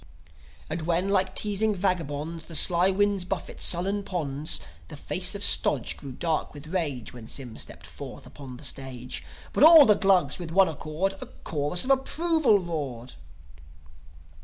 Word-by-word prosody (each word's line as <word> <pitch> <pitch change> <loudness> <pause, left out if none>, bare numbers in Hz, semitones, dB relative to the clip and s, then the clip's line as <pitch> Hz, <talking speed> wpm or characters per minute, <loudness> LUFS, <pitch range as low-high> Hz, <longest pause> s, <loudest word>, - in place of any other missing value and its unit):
As 160 +2 -4
when, 175 +4 0
like 190 -1 +1
teasing 210 +1 +1
vagabonds, 165 -4 -3
The 165 - -7
sly 175 +4 +5
winds 200 0 +1
buffet 185 +1 -5
sullen 195 +4 +1
ponds, 155 -6 -2 0.3
The - - -9
face - - -2
of - - -4
Stodge - - +3
grew 140 - -10
dark 160 +2 -2
with 145 +1 -10
rage, 150 -11 -3
When 120 -3 -11
Sym 125 -5 -6
stepped - - -9
forth - - -10
upon 130 -3 -11
the 150 - -13
stage. 130 -3 -4 0.3
But - - +2
all 315 -2 +10
the 215 - +6
Glugs, 190 -7 +2
with 170 -2 -6
one 190 +2 +5
accord, 160 +5 -3
A - - -7
chorus 150 +3 -3
of 265 - 0
approval 290 -2 +2
roared. 145 -9 -5
175 Hz, 160 wpm, -26 LUFS, 145-195 Hz, 0.3 s, all